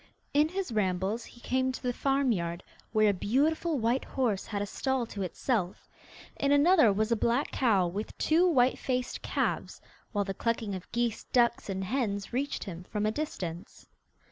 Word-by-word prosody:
In 300 Hz, +2 st, +4 dB
his 375 Hz, -5 st, -3 dB
rambles 200 Hz, +1 st, 0 dB
he 240 Hz, -, -15 dB
came 260 Hz, +1 st, +1 dB
to -, -, -8 dB
the 250 Hz, -1 st, 0 dB
farmyard, 235 Hz, -12 st, 0 dB, 0.3 s
where 215 Hz, -2 st, +4 dB
a -, -, -2 dB
beautiful 295 Hz, -, +1 dB
white 240 Hz, +2 st, +1 dB
horse 230 Hz, -8 st, -1 dB
had 205 Hz, -, -3 dB
a 205 Hz, -, -1 dB
stall 265 Hz, +4 st, -1 dB
to 205 Hz, -3 st, -7 dB
itself; 190 Hz, 0 st, -2 dB, 0.5 s
in 280 Hz, -, +1 dB
another 290 Hz, -, +6 dB
was 215 Hz, +3 st, 0 dB
a -, -, +5 dB
black 235 Hz, +5 st, +1 dB
cow 215 Hz, -8 st, +3 dB
with 195 Hz, +5 st, -5 dB
two 335 Hz, +4 st, +3 dB
white 255 Hz, -5 st, +3 dB
faced 255 Hz, -1 st, -2 dB
calves, -, -, -2 dB, 0.3 s
while 205 Hz, -2 st, 0 dB
the 195 Hz, -, -3 dB
clucking 225 Hz, 0 st, -1 dB
of 185 Hz, -2 st, -7 dB
geese, 235 Hz, -2 st, -1 dB
ducks, 235 Hz, -3 st, +2 dB
and 190 Hz, 0 st, -2 dB
hens 205 Hz, -2 st, -2 dB
reached 280 Hz, +3 st, -1 dB
him 180 Hz, -3 st, -7 dB
from 210 Hz, +2 st, -2 dB
a 215 Hz, -, +2 dB
distance. 185 Hz, -, -5 dB
230 Hz, 175 wpm, -29 LUFS, 200-265 Hz, 0.5 s, another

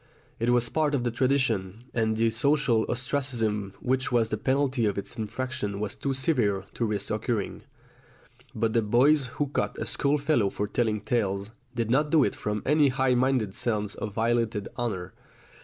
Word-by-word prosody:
It 115 Hz, +2 st, +1 dB
was 120 Hz, -1 st, +3 dB
part 150 Hz, +3 st, +1 dB
of 125 Hz, -, -1 dB
the 120 Hz, -, 0 dB
tradition, 115 Hz, -6 st, 0 dB
and 110 Hz, -2 st, +1 dB
the 115 Hz, 0 st, +2 dB
social 125 Hz, -1 st, +2 dB
ostracism 120 Hz, -6 st, -1 dB
which 130 Hz, +1 st, 0 dB
was 115 Hz, -2 st, +2 dB
the 110 Hz, -, 0 dB
penalty 130 Hz, -2 st, +1 dB
of 100 Hz, -, -1 dB
its 100 Hz, -, -4 dB
infraction 110 Hz, -2 st, -3 dB
was 105 Hz, -1 st, -2 dB
too 140 Hz, -, -3 dB
severe 125 Hz, -, +1 dB
to 120 Hz, -, -1 dB
risk 105 Hz, -2 st, -2 dB
incurring. 110 Hz, -1 st, -2 dB, 0.9 s
But 110 Hz, 0 st, 0 dB
the 115 Hz, -, +3 dB
boys 130 Hz, +6 st, +4 dB
who 145 Hz, -, +1 dB
cut -, -, -2 dB
a -, -, -3 dB
schoolfellow 140 Hz, -6 st, +1 dB
for 105 Hz, +1 st, -3 dB
telling 110 Hz, -1 st, 0 dB
tales, 100 Hz, -2 st, -1 dB, 0.2 s
did 115 Hz, -1 st, -1 dB
not 150 Hz, +4 st, +3 dB
do 155 Hz, -2 st, +5 dB
it -, -, 0 dB
from 105 Hz, 0 st, -3 dB
any 150 Hz, +1 st, +4 dB
high 130 Hz, -1 st, +2 dB
minded 125 Hz, -5 st, +1 dB
sense 105 Hz, -3 st, -1 dB
of 105 Hz, -, -5 dB
violated 115 Hz, -2 st, 0 dB
honour. 95 Hz, -7 st, -3 dB
115 Hz, 175 wpm, -27 LUFS, 105-130 Hz, 0.9 s, do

